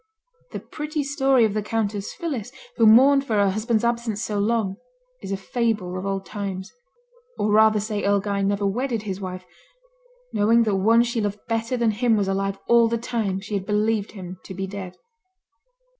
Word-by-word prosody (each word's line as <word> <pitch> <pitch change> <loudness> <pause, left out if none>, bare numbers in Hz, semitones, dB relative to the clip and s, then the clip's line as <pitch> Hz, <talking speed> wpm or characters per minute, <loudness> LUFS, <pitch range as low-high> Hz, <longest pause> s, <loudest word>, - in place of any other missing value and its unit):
The - - -5
pretty 300 0 -4
story 270 -3 +3
of 210 - -1
the 215 - -1
Countess 210 -2 -2
Phillis, 265 - -4 0.3
who 225 -2 +5
mourned 270 +5 +6
for 230 -6 -2
her 200 -2 +3
husband's 220 +2 0
absence 235 -2 -1
so 210 -2 -2
long, 205 -2 0 0.4
is 195 - -6
a 195 - -1
fable 210 -3 -2
of 185 +1 -4
old 195 -1 -2
times; 195 -2 -5 0.6
or 210 - 0
rather 215 0 +5
say 210 0 -3
Earl 200 0 +3
Guy 200 0 -2
never 200 +1 0
wedded 230 +2 -1
his 195 -2 -5
wife, 185 -1 -6 0.9
knowing 225 +3 +4
that 210 -3 +1
one 225 +5 +4
she 235 -1 -2
loved 205 0 -3
better 230 +2 -1
than 235 -2 +2
him 225 +1 +2
was 200 -2 0
alive 195 0 -1
all 235 -1 +5
the 230 +1 0
time 225 -5 -2
she 210 +2 -8
had 195 -1 -2
believed 210 0 0
him 185 -3 -8
to 190 - -8
be 190 +1 -3
dead. 190 -2 -7
210 Hz, 190 wpm, -23 LUFS, 195-230 Hz, 0.9 s, mourned